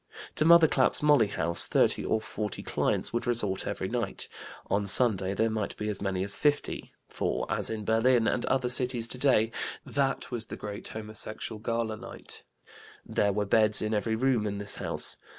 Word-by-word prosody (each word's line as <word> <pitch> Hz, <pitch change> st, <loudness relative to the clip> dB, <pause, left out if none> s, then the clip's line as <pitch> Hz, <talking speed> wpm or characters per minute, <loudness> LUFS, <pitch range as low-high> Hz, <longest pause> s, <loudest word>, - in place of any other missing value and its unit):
To 155 Hz, -, +3 dB
Mother 170 Hz, -1 st, +7 dB
Clap's 135 Hz, 0 st, +1 dB
Molly 145 Hz, -7 st, +5 dB
house 85 Hz, -4 st, 0 dB
30 -, -, +2 dB
or 110 Hz, -, +1 dB
40 105 Hz, -2 st, -5 dB
clients -, -, -1 dB
would 120 Hz, +1 st, -2 dB
resort 105 Hz, -6 st, 0 dB
every -, -, -3 dB
night; -, -, -3 dB, 0.4 s
on 100 Hz, 0 st, -1 dB
Sunday 100 Hz, -4 st, +3 dB
there 110 Hz, +1 st, +1 dB
might 110 Hz, -2 st, -3 dB
be 105 Hz, -, -3 dB
as 105 Hz, -, -4 dB
many 95 Hz, -2 st, -1 dB
as 100 Hz, +1 st, -1 dB
50, 145 Hz, +7 st, -1 dB, 0.2 s
for, -, -, -2 dB
as -, -, -1 dB
in 110 Hz, -2 st, -4 dB
Berlin 115 Hz, +1 st, +3 dB
and 120 Hz, -, 0 dB
other 130 Hz, -1 st, +1 dB
cities 125 Hz, -2 st, +5 dB
today, 125 Hz, -3 st, +2 dB, 0.3 s
that 135 Hz, -2 st, -1 dB
was 115 Hz, -2 st, -5 dB
the -, -, -7 dB
great 100 Hz, -1 st, -6 dB
homosexual 110 Hz, 0 st, -7 dB
gala 115 Hz, 0 st, -2 dB
night; -, -, -8 dB, 0.6 s
there 100 Hz, -, +1 dB
were 105 Hz, +1 st, -1 dB
beds 105 Hz, +1 st, +4 dB
in 110 Hz, +1 st, -1 dB
every 110 Hz, +1 st, 0 dB
room 120 Hz, -3 st, +1 dB
in 100 Hz, 0 st, -3 dB
this 100 Hz, 0 st, -2 dB
house. -, -, -2 dB
110 Hz, 180 wpm, -28 LUFS, 105-125 Hz, 0.6 s, Mother